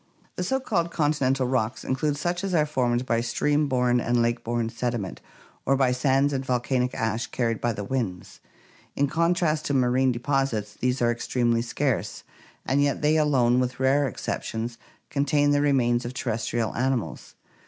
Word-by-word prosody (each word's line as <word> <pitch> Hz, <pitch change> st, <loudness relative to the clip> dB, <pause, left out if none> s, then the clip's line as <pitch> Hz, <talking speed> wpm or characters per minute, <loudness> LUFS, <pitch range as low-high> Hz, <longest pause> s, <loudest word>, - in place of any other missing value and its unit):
The 180 Hz, -, -2 dB
so 265 Hz, +9 st, 0 dB
called 190 Hz, -10 st, -1 dB
continental 140 Hz, -5 st, +1 dB
rocks 125 Hz, -2 st, -1 dB
include 145 Hz, +2 st, 0 dB
such 175 Hz, +5 st, -2 dB
as 190 Hz, -2 st, -1 dB
are 155 Hz, -2 st, +3 dB
formed 125 Hz, -4 st, 0 dB
by 115 Hz, -2 st, +1 dB
stream 145 Hz, +5 st, +1 dB
borne 125 Hz, -2 st, +2 dB
and 120 Hz, +1 st, +1 dB
lake 120 Hz, 0 st, 0 dB
borne 115 Hz, -1 st, -1 dB
sediment 120 Hz, -5 st, -3 dB, 0.4 s
or 135 Hz, -, +2 dB
by 130 Hz, -2 st, +3 dB
sands 135 Hz, +2 st, +2 dB
and 135 Hz, -1 st, -1 dB
volcanic 125 Hz, 0 st, 0 dB
ash 115 Hz, +1 st, -1 dB
carried 115 Hz, -3 st, -1 dB
by 120 Hz, -1 st, 0 dB
the 105 Hz, -, -5 dB
winds. 100 Hz, -6 st, -4 dB, 0.6 s
In 140 Hz, -, +2 dB
contrast 165 Hz, 0 st, +1 dB
to 145 Hz, -, 0 dB
marine 130 Hz, 0 st, +3 dB
deposits 120 Hz, -4 st, -1 dB
these 125 Hz, +2 st, -1 dB
are 120 Hz, -, +3 dB
extremely 120 Hz, 0 st, 0 dB
scarce, 125 Hz, +1 st, -2 dB, 0.4 s
and 140 Hz, +2 st, +2 dB
yet 145 Hz, +1 st, 0 dB
they 150 Hz, +1 st, +4 dB
alone, 130 Hz, -6 st, +3 dB
with 125 Hz, 0 st, -2 dB
rare 135 Hz, +2 st, +3 dB
exceptions, 115 Hz, 0 st, -4 dB, 0.3 s
contain 145 Hz, 0 st, +2 dB
the 145 Hz, 0 st, +3 dB
remains 125 Hz, -4 st, +2 dB
of 120 Hz, +2 st, -6 dB
terrestrial 115 Hz, -2 st, -2 dB
animals. 130 Hz, -2 st, -2 dB
130 Hz, 165 wpm, -25 LUFS, 120-145 Hz, 0.6 s, they